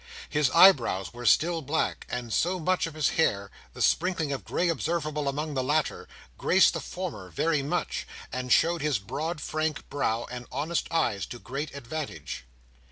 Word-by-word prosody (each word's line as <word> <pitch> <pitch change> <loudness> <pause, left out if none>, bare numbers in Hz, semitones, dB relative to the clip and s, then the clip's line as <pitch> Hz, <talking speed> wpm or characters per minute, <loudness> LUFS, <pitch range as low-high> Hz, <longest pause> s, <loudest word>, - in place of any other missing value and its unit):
His 150 -3 +3
eyebrows 130 - +5
were 120 0 -4
still 165 0 +4
black, 155 +3 -1
and 120 -2 -4
so 180 +3 +2
was 165 - -8
much 185 -2 +2
of 160 - -9
his 155 -2 +2
hair; 100 -8 +1 0.2
the - - -2
sprinkling 165 -4 +1
of 135 - -3
grey 180 - 0
observable 155 -3 -1
among 150 +2 -3
the 130 - 0
latter, 150 +3 0 0.3
graced - - +5
the - - -2
former 95 - -6
very 150 - +1
much, 140 - -2 0.3
and 125 0 -3
showed 170 +4 +4
his 150 -4 +1
broad 150 - -4
frank 155 0 -2
brow 115 -5 0
and 125 -1 -7
honest 155 +6 -1
eyes 110 - 0
to 120 - -7
great 140 +5 -5
advantage. 140 - -6
150 Hz, 170 wpm, -28 LUFS, 125-160 Hz, 0.3 s, eyebrows